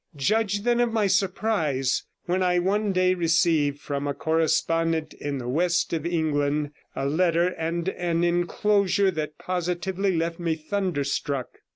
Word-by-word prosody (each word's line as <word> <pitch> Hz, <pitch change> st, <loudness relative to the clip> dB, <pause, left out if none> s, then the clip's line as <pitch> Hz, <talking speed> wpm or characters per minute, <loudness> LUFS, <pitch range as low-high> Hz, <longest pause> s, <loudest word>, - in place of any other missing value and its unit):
Judge, 205 Hz, +7 st, +1 dB
then, 240 Hz, 0 st, +2 dB
of 240 Hz, -1 st, +2 dB
my 220 Hz, -2 st, +1 dB
surprise 185 Hz, -, 0 dB, 0.2 s
when 185 Hz, 0 st, 0 dB
I 180 Hz, -1 st, +2 dB
one 200 Hz, +3 st, +1 dB
day 185 Hz, 0 st, +3 dB
received 165 Hz, -4 st, +2 dB
from 145 Hz, 0 st, -3 dB
a 140 Hz, -, -2 dB
correspondent 165 Hz, 0 st, +1 dB
in 145 Hz, -1 st, -4 dB
the 125 Hz, -2 st, -5 dB
west 170 Hz, +8 st, +1 dB
of 165 Hz, 0 st, -1 dB
England 150 Hz, -3 st, 0 dB, 0.2 s
a 135 Hz, -, -2 dB
letter 170 Hz, +3 st, +2 dB
and 170 Hz, 0 st, -3 dB
an 175 Hz, -2 st, -1 dB
enclosure 190 Hz, +3 st, +2 dB
that 155 Hz, -3 st, -4 dB
positively 180 Hz, +1 st, -1 dB
left 165 Hz, +1 st, -2 dB
me 165 Hz, -2 st, 0 dB
thunderstruck. 150 Hz, -6 st, -2 dB
170 Hz, 145 wpm, -25 LUFS, 155-185 Hz, 0.2 s, day